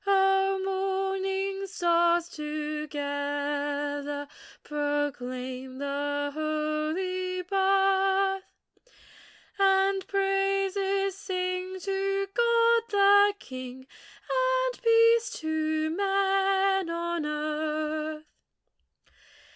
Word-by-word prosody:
O 385 Hz, 0 st, +3 dB
morning 385 Hz, 0 st, -1 dB
stars, 345 Hz, -2 st, +2 dB
together 290 Hz, -1 st, -3 dB, 0.4 s
Proclaim 260 Hz, -3 st, -3 dB
the 285 Hz, +1 st, -2 dB
holy 310 Hz, +5 st, -2 dB
birth! 390 Hz, 0 st, +2 dB, 1.2 s
And 385 Hz, 0 st, +3 dB
praises 390 Hz, 0 st, 0 dB
sing 365 Hz, -1 st, -3 dB
to 390 Hz, 0 st, -1 dB
God 465 Hz, -1 st, +4 dB
the 405 Hz, 0 st, +5 dB
King, 255 Hz, -2 st, -9 dB, 0.4 s
And -, -, 0 dB
peace 460 Hz, 0 st, +5 dB
to 315 Hz, 0 st, -1 dB
men 390 Hz, 0 st, +1 dB
on 340 Hz, -1 st, -2 dB
earth. 305 Hz, 0 st, -3 dB
370 Hz, 65 wpm, -27 LUFS, 300-390 Hz, 1.2 s, the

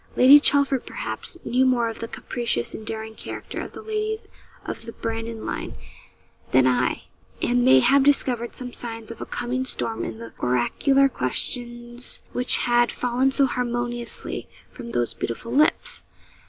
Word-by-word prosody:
Lady 270 Hz, +4 st, +9 dB
Chelford, 280 Hz, -3 st, +3 dB
perhaps, -, -, -4 dB
knew 255 Hz, +2 st, +2 dB
more 250 Hz, -3 st, +3 dB
of 225 Hz, -, -5 dB
the 230 Hz, -, -4 dB
capricious 235 Hz, -, -2 dB
and 220 Hz, -, -8 dB
daring 220 Hz, 0 st, -4 dB
character -, -, -6 dB
of -, -, -8 dB
the -, -, -9 dB
ladies 435 Hz, 0 st, -3 dB, 0.4 s
of -, -, -6 dB
the 230 Hz, -, -6 dB
Brandon 225 Hz, 0 st, -4 dB
line -, -, -4 dB, 0.7 s
than 130 Hz, 0 st, +5 dB
I, 125 Hz, -1 st, +1 dB, 0.4 s
and 120 Hz, 0 st, +2 dB
may 130 Hz, +1 st, +7 dB
have 275 Hz, -, +5 dB
discovered 255 Hz, -4 st, +2 dB
some 250 Hz, -1 st, -7 dB
signs 230 Hz, -1 st, -7 dB
of 230 Hz, -, -9 dB
a -, -, -5 dB
coming 250 Hz, +2 st, -2 dB
storm 115 Hz, -, -3 dB
in 110 Hz, -, -5 dB
the 115 Hz, 0 st, -9 dB
oracular 270 Hz, -, +3 dB
questions 240 Hz, -, -4 dB
which 250 Hz, 0 st, +3 dB
had 240 Hz, 0 st, +3 dB
fallen 250 Hz, +2 st, +1 dB
so 275 Hz, +1 st, +3 dB
harmoniously 240 Hz, -1 st, -3 dB, 0.2 s
from 240 Hz, -3 st, -9 dB
those 120 Hz, -, 0 dB
beautiful 120 Hz, -, -5 dB
lips. 295 Hz, +5 st, +2 dB
240 Hz, 155 wpm, -24 LUFS, 220-260 Hz, 0.7 s, Lady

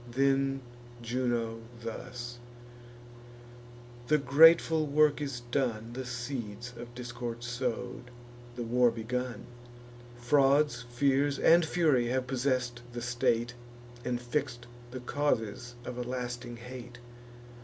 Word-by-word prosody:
Then 135 Hz, +1 st, +2 dB, 0.4 s
Juno 115 Hz, -2 st, -1 dB, 0.2 s
thus: 120 Hz, +1 st, -6 dB, 1.7 s
"The 150 Hz, -, +5 dB
grateful 155 Hz, +3 st, +6 dB
work 150 Hz, +1 st, +3 dB
is 135 Hz, -4 st, -3 dB
done, 120 Hz, -4 st, -1 dB
The 130 Hz, +1 st, -5 dB
seeds 120 Hz, -2 st, -5 dB
of 120 Hz, 0 st, -9 dB
discord 120 Hz, -1 st, -5 dB
sow'd, 125 Hz, 0 st, -3 dB, 0.5 s
the 120 Hz, -, -3 dB
war 120 Hz, +1 st, +4 dB
begun; 120 Hz, +2 st, -3 dB, 0.7 s
Frauds, 135 Hz, 0 st, +3 dB
fears, 140 Hz, +3 st, +2 dB
and 170 Hz, +1 st, +6 dB
fury 155 Hz, -7 st, +2 dB
have 130 Hz, +1 st, 0 dB
possess'd 125 Hz, -2 st, -1 dB
the 120 Hz, -, -4 dB
state, 120 Hz, -1 st, +1 dB, 0.5 s
And 120 Hz, 0 st, -1 dB
fix'd 125 Hz, -1 st, -2 dB, 0.2 s
the 125 Hz, +1 st, -7 dB
causes 120 Hz, -3 st, -1 dB
of 125 Hz, -1 st, -5 dB
a -, -, -1 dB
lasting 120 Hz, -1 st, -4 dB
hate. 120 Hz, 0 st, -9 dB
125 Hz, 110 wpm, -30 LUFS, 120-135 Hz, 1.7 s, grateful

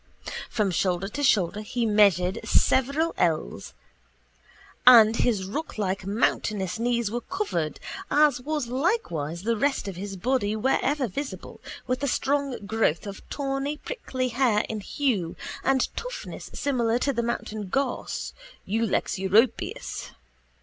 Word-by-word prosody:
From 210 Hz, -4 st, 0 dB
shoulder 180 Hz, +2 st, 0 dB
to 290 Hz, -, -5 dB
shoulder 205 Hz, -7 st, +2 dB
he 235 Hz, +2 st, -2 dB
measured 200 Hz, -4 st, +4 dB
several 280 Hz, +6 st, +2 dB
ells 160 Hz, -, -1 dB, 1.1 s
and 225 Hz, -3 st, +9 dB
his 215 Hz, -6 st, +1 dB
rocklike 195 Hz, -6 st, -3 dB
mountainous 205 Hz, -2 st, 0 dB
knees 235 Hz, -2 st, 0 dB
were 240 Hz, +1 st, -2 dB
covered, 235 Hz, -, -2 dB, 0.3 s
as 290 Hz, -4 st, +4 dB
was 300 Hz, 0 st, -2 dB
likewise 235 Hz, -, -1 dB
the 230 Hz, +2 st, +1 dB
rest 275 Hz, 0 st, 0 dB
of 190 Hz, -3 st, -5 dB
his 195 Hz, +1 st, -5 dB
body 215 Hz, +1 st, 0 dB
wherever 265 Hz, +4 st, +1 dB
visible, 275 Hz, +7 st, -6 dB, 0.2 s
with 255 Hz, +1 st, -1 dB
a 285 Hz, -, 0 dB
strong 275 Hz, -4 st, 0 dB
growth 215 Hz, -6 st, +1 dB
of 200 Hz, -1 st, -7 dB
tawny 275 Hz, +1 st, -2 dB
prickly 260 Hz, -, -3 dB
hair 240 Hz, -4 st, +2 dB
in 220 Hz, -, -4 dB
hue 205 Hz, -, -1 dB, 0.3 s
and 265 Hz, -1 st, +1 dB
toughness -, -, -6 dB
similar 240 Hz, -5 st, 0 dB
to 275 Hz, +3 st, 0 dB
the 235 Hz, -, 0 dB
mountain 220 Hz, -3 st, -3 dB
gorse 270 Hz, +6 st, -2 dB, 0.3 s
(Ulex 215 Hz, -2 st, 0 dB
Europeus). 210 Hz, +5 st, +1 dB
230 Hz, 130 wpm, -26 LUFS, 200-270 Hz, 1.1 s, and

